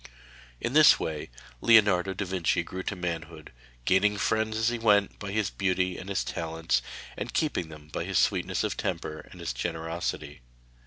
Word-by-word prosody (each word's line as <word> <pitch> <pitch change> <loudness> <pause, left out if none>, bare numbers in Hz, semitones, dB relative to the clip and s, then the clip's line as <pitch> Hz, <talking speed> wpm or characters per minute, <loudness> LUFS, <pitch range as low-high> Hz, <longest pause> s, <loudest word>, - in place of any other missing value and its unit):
In 120 - -2
this 155 0 +7
way 75 -2 -4 0.3
Leonardo 100 -4 +5
da 100 - -2
Vinci 90 -2 0
grew 95 +2 -6
to 100 - -3
manhood, 85 -3 -5 0.3
gaining 105 +2 +3
friends 110 +1 0
as 110 +1 +2
he 120 -1 -3
went 105 -3 +3
by 100 -1 -5
his 105 -1 0
beauty 90 -2 0
and 95 - -8
his 100 - 0
talents, 80 -5 -1 0.3
and - - -6
keeping 145 - 0
them 75 -1 -12
by 75 - -4
his - - -1
sweetness - - +1
of - - -1
temper 75 - -3
and - - -13
his - - -3
generosity. 80 +3 -4
95 Hz, 170 wpm, -28 LUFS, 80-105 Hz, 0.3 s, this